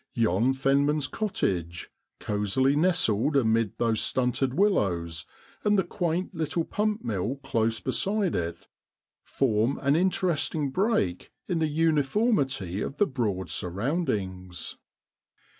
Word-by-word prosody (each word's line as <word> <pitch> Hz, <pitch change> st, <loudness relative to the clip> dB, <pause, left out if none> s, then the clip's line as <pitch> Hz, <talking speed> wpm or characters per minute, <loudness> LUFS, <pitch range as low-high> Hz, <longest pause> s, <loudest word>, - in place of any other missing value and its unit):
Yon 115 Hz, +2 st, +2 dB
fenman's 140 Hz, +2 st, +2 dB
cottage, 90 Hz, -, -2 dB, 0.3 s
cosily 105 Hz, +7 st, +1 dB
nestled 150 Hz, -, +2 dB
amid 115 Hz, -4 st, +1 dB
those 115 Hz, -2 st, +1 dB
stunted 130 Hz, +1 st, 0 dB
willows, 90 Hz, -, +1 dB, 0.4 s
and 210 Hz, 0 st, +3 dB
the 190 Hz, -, +3 dB
quaint 175 Hz, +1 st, -2 dB
little 160 Hz, 0 st, -1 dB
pump 215 Hz, +4 st, -1 dB
mill 105 Hz, +4 st, -2 dB
close 115 Hz, -3 st, 0 dB
beside 200 Hz, -, 0 dB
it, 85 Hz, 0 st, -3 dB, 0.6 s
form 115 Hz, 0 st, +1 dB
an 140 Hz, +1 st, +3 dB
interesting 165 Hz, -5 st, 0 dB
break 180 Hz, -, 0 dB, 0.2 s
in 175 Hz, -3 st, 0 dB
the 160 Hz, -, +2 dB
uniformity 145 Hz, -, +1 dB
of 140 Hz, -, -4 dB
the 205 Hz, -, +4 dB
Broad's 110 Hz, -, -2 dB
surround 120 Hz, -, -1 dB
ings. 95 Hz, -3 st, -4 dB
135 Hz, 115 wpm, -27 LUFS, 105-165 Hz, 0.6 s, the